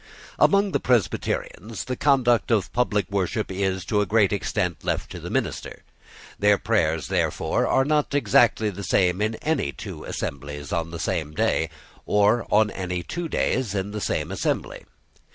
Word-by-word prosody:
Among 200 0 +4
the - - +1
Presbyterians 115 -2 -1
the 125 - -3
conduct 125 -4 +3
of 110 -6 +1
public 105 -5 +1
worship 100 +2 -1
is, 95 -1 -1
to 105 +1 +1
a 100 - -1
great 105 -2 +3
extent, 90 -3 -2
left - - -2
to - - -7
the - - -7
minister. - - -3 0.6
Their 105 0 +4
prayers, 85 -8 0
therefore, - - 0
are 135 - +3
not 150 -1 +1
exactly 115 -6 +3
the 100 +1 -7
same 90 0 +2
in 110 +1 0
any 150 - 0
two - - -8
assemblies 70 +1 -5
on 85 -1 -1
the 85 - -6
same 75 -1 -2
day, 80 +1 +1 0.4
or 105 +3 +3
on 105 0 +3
any 90 -2 -3
two 170 - -4
days 120 -9 0
in 100 +1 -2
the 105 0 -4
same 75 -1 -1
assembly. 95 - -2
105 Hz, 165 wpm, -24 LUFS, 90-120 Hz, 0.6 s, Among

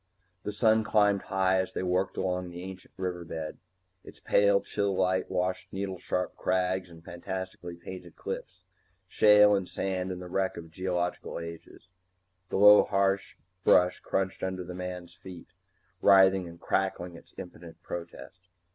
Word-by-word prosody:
The 105 - -4
sun 110 +1 +3
climbed 105 -2 +3
high 95 0 +1
as 95 - -6
they - - -3
worked 90 +1 0
along 90 -1 -1
the 90 +1 -8
ancient 95 0 -10
river 90 -2 -3
bed. 80 -1 -6 0.4
Its - - -13
pale 100 0 +4
chill 100 -2 -1
light 95 0 +1
washed 90 +1 -2
needle 95 -1 -4
sharp 90 0 -2
crags 95 0 0
and 85 -1 -15
fantastically 90 0 -6
painted 85 0 -10
cliffs, - - -7 0.4
shale 105 -1 +6
and 95 -2 0
sand 95 -1 -2
and 90 - -5
the 90 - -8
wreck 95 +1 -1
of 80 -1 -9
geological 90 0 -2
ages. 85 +2 -10 0.6
The - - -1
low 105 +1 +9
harsh 95 0 0 0.3
brush 90 0 +4
crunched 95 -1 -2
under 95 -1 -3
the 90 +1 -8
man's 90 -1 -6
feet, 90 -1 -12 0.5
writhing 95 -2 +6
and 85 0 -11
crackling 90 -2 -1
its - - -16
impotent 85 -2 -10
protest. 90 +1 -8
95 Hz, 155 wpm, -29 LUFS, 90-95 Hz, 0.6 s, low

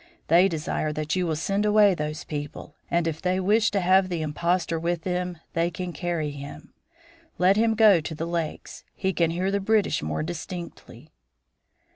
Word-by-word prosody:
They 175 +3 +6
desire 160 -2 -2
that 155 +2 -2
you 180 -1 0
will 160 - 0
send 195 +6 -1
away 210 -1 +5
those 150 -2 -4
people, 145 -1 -7
and 170 -1 +1
if 160 -1 -3
they 185 +1 0
wish 210 +3 +3
to 200 - 0
have 185 +1 +4
the 170 -3 -2
impostor 170 +2 -1
with 170 0 -2
them 180 -1 -2 0.2
they 165 +1 +1
can 175 0 -5
carry 160 -1 -2
him. 145 +1 -10 0.6
Let 185 +2 +4
him 225 +1 +2
go 210 -6 +6
to 160 +1 -6
the 160 - -3
lakes; 170 -2 -4
he 190 0 -1
can 170 -1 +2
hear 180 +4 -1
the 200 - +1
British 210 +1 +1
more 75 - -2
distinctly." 165 -4 -8
175 Hz, 180 wpm, -25 LUFS, 155-190 Hz, 0.6 s, They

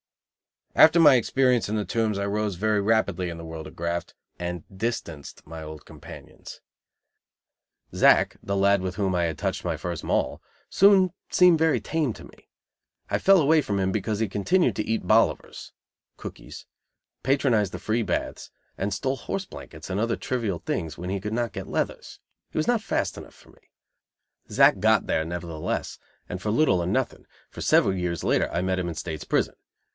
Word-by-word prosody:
After 160 +2 +7
my 150 -4 +8
experience 125 0 +2
in 110 - -1
the 105 -1 -1
Tombs 110 -4 0
I 100 - -1
rose 105 -1 -1
very 105 +2 +1
rapidly 100 -4 +1
in 85 - -6
the 85 - -8
world 80 -1 -7
of - - -13
graft, 85 +1 -3 0.2
and 90 -2 -4
distanced 95 -9 -5
my 80 +1 -9
old 75 -1 -9
companions. - - -12 1.3
Zack, - - +4
the 100 - -3
lad 100 0 +3
with 95 -1 -4
whom 95 -3 0
I 90 -1 +1
had 80 -3 -3
touched - - -3
my - - -1
first 85 -2 -5
Moll, - - -1 0.3
soon 195 -2 +5 0.2
seemed 180 -3 +5
very 160 -1 +3
tame 155 -7 -1
to - - -12
me. - - -17 0.6
I - - +1
fell 195 -1 +6
away 155 +2 +4
from 100 -7 -2
him 95 0 +1
because 105 +1 -2
he 110 -3 0
continued 120 - +1
to 105 - 0
eat 115 0 -2
bolivers 110 +1 +1 0.5
(cookies), - - -10 0.6
patronize 125 -7 +2
the 90 - -7
free 110 +5 -1
baths, 110 - -3 0.3
and 100 +1 -1
stole 135 +7 -2
horse 195 +10 -4
blankets 80 - -11
and 95 +1 -2
other 115 +1 0
trivial 110 -9 -2
things 80 -2 -4
when 90 +1 -5
he 100 - -1
could 105 +3 -5
not 120 -3 -1
get 95 -2 -6
"leathers." - - -3 0.3
He - - -9
was 155 - 0
not 240 -2 +2
fast - - -2
enough - - -11
for - - -19
me. - - -26 0.8
Zack - - +5
"got - - +3
there," 80 - 0
nevertheless, 85 -2 -4 0.3
and 90 - -5
for 105 - -2
little 105 - +3
or 85 - -2
nothing, 125 +6 -2 0.2
for - - -9
several 95 - +3
years 90 -2 -3
later - - +1
I 85 - -1
met 95 0 0
him 90 - -2
in 85 - -4
State's 80 -1 -5
prison. - - 0
100 Hz, 185 wpm, -25 LUFS, 90-120 Hz, 1.3 s, my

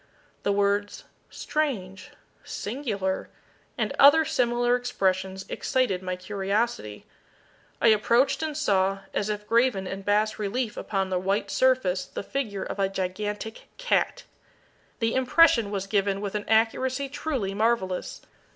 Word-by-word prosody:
The 200 - 0
words 205 +1 0 0.3
"Strange!" 195 -12 -3 0.3
"Singular!" 205 -5 -3 0.5
and - - -1
other 300 +3 +7
similar 240 -2 +2
expressions, 190 -6 -1
excited 245 -9 0
my 185 -1 -3
curiosity. 195 - -2 0.7
I 230 - +5
approached 235 +7 +3
and 310 -2 -3
saw, 195 -7 +1
as 205 - -1
if 210 0 -3
graven 230 -3 +2
in 190 +1 -5
bas 210 +2 +1
relief 215 +3 -2
upon 195 -2 -2
the 180 - +1
white 195 +2 -1
surface 250 -9 +2
the - - -6
figure 215 -6 -3
of - - -6
a 195 -1 +2
gigantic 205 +3 -4
cat. - - 0 0.7
The 225 -1 0
impression 260 -4 +4
was 195 -2 -3
given 195 -1 0
with 200 -1 -4
an 210 -1 -3
accuracy 255 +5 +2
truly 265 -8 -3
marvellous. 205 -4 -1
210 Hz, 130 wpm, -26 LUFS, 195-245 Hz, 0.7 s, other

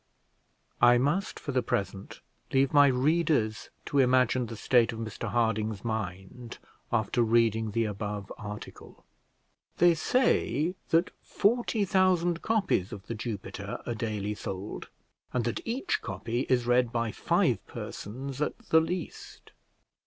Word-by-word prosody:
I 120 0 +7
must 145 +10 0
for 140 - -5
the 130 -1 +1
present 100 -4 -3 0.3
leave 135 0 +2
my 145 -1 +7
readers 140 -4 +1 0.2
to 145 - 0
imagine 125 -1 +3
the 115 - -7
state 115 +1 +3
of 115 - -7
Mr 110 -1 -5
Harding's 110 -2 0
mind 110 +2 -5 0.3
after 115 +1 +1
reading 110 -1 +2
the 115 +2 0
above 105 -1 -4
article. 105 -1 -9 0.7
They 175 -1 +6
say 165 - +1 0.2
that 165 +2 +3
forty 225 -1 +1
thousand 180 -3 +2
copies 195 - +1
of 105 -3 -8
The - - -4
Jupiter 110 -3 -5
are 120 - -2
daily 105 -2 -3
sold, 100 0 -6 0.4
and 120 -3 0
that 120 - -1
each 315 - -1
copy 120 - -3
is 125 -2 +2
read 125 -1 +3
by 115 -2 -1
five - - +1
persons 130 +6 -6
at 150 - -1
the 160 - +7
least. 175 +1 -6
120 Hz, 135 wpm, -29 LUFS, 110-150 Hz, 0.7 s, I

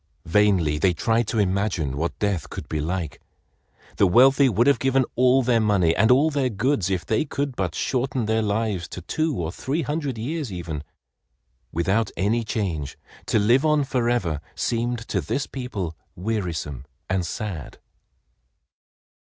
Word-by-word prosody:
Vainly 85 -5 +3
they 95 +1 +3
tried 115 +6 +1
to 115 - -2
imagine 95 -8 0
what 80 +4 -2
death 100 -6 -1
could - - -7
be 80 - -2
like. 80 -1 -3 0.8
The 100 - +5
wealthy 135 +7 +6
would 115 +2 +2
have 140 0 +4
given 135 -1 +2
all 130 +2 +4
their 120 -1 +3
money 100 -7 +3
and 110 +3 +3
all 140 +5 +5
their 140 -3 +1
goods 110 -3 0
if 90 -3 -1
they 110 - +1
could 140 -3 -3
but 90 -6 -2
shorten 130 -2 -1
their 110 +1 +1
lives 105 -4 -1
to 90 - -8
two 155 - -1
or 80 -2 -2
three 145 - -2
hundred 145 -3 -2
years 140 +2 -3
even. 85 -5 -5 0.9
Without 95 +7 +1
any 110 +5 +1
change 90 -10 -3 0.3
to - - +2
live 120 +6 +4
on 150 -2 +3
forever 120 - 0
seemed 120 0 -1
to 95 - 0
this 135 - -2
people 105 - -5 0.2
wearisome 85 - -3 0.2
and 95 -1 0
sad. 85 - -5
110 Hz, 155 wpm, -24 LUFS, 90-125 Hz, 0.9 s, wealthy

